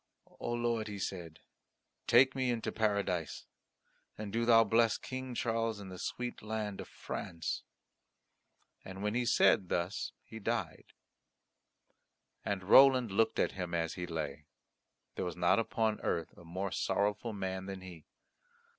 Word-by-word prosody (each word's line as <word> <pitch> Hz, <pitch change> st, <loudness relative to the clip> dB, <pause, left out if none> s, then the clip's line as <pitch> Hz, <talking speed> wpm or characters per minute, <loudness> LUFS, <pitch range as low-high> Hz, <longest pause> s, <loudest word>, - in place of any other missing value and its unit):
"O -, -, -3 dB
Lord," 120 Hz, -2 st, 0 dB
he 105 Hz, -1 st, -5 dB
said, 85 Hz, -4 st, -5 dB, 0.7 s
"take 130 Hz, +3 st, +6 dB
me 130 Hz, -1 st, 0 dB
into 120 Hz, -2 st, -1 dB
Paradise. 100 Hz, -6 st, -1 dB, 0.7 s
And 105 Hz, -2 st, -6 dB
do 115 Hz, +1 st, +1 dB
Thou 115 Hz, -1 st, +7 dB
bless 115 Hz, +1 st, +3 dB
King 130 Hz, -1 st, -6 dB
Charles 115 Hz, -2 st, 0 dB
and 95 Hz, -2 st, -8 dB
the 90 Hz, -, -8 dB
sweet 125 Hz, 0 st, -4 dB
land 105 Hz, -2 st, -3 dB
of -, -, -9 dB
France." 85 Hz, -2 st, -4 dB, 1.2 s
And 95 Hz, +1 st, -8 dB
when 105 Hz, 0 st, 0 dB
he 120 Hz, -, +1 dB
had 120 Hz, -1 st, +1 dB
said 100 Hz, -5 st, +4 dB
thus 90 Hz, +4 st, -1 dB
he 110 Hz, -, -10 dB
died. 110 Hz, -7 st, -3 dB, 1.5 s
And 100 Hz, -2 st, -2 dB
Roland 130 Hz, +2 st, +7 dB
looked 110 Hz, +3 st, +2 dB
at -, -, +2 dB
him 90 Hz, -2 st, -4 dB
as 80 Hz, -1 st, -1 dB
he 90 Hz, -1 st, -5 dB
lay. 75 Hz, -3 st, -4 dB, 0.7 s
There -, -, -3 dB
was 90 Hz, -2 st, -4 dB
not 90 Hz, +5 st, +4 dB
upon 110 Hz, -1 st, 0 dB
earth 85 Hz, -2 st, -2 dB
a -, -, -14 dB
more 95 Hz, +3 st, -4 dB
sorrowful 105 Hz, +4 st, 0 dB
man 95 Hz, -1 st, -4 dB
than 95 Hz, -1 st, -6 dB
he. 90 Hz, -4 st, -11 dB
105 Hz, 150 wpm, -33 LUFS, 90-115 Hz, 1.5 s, Thou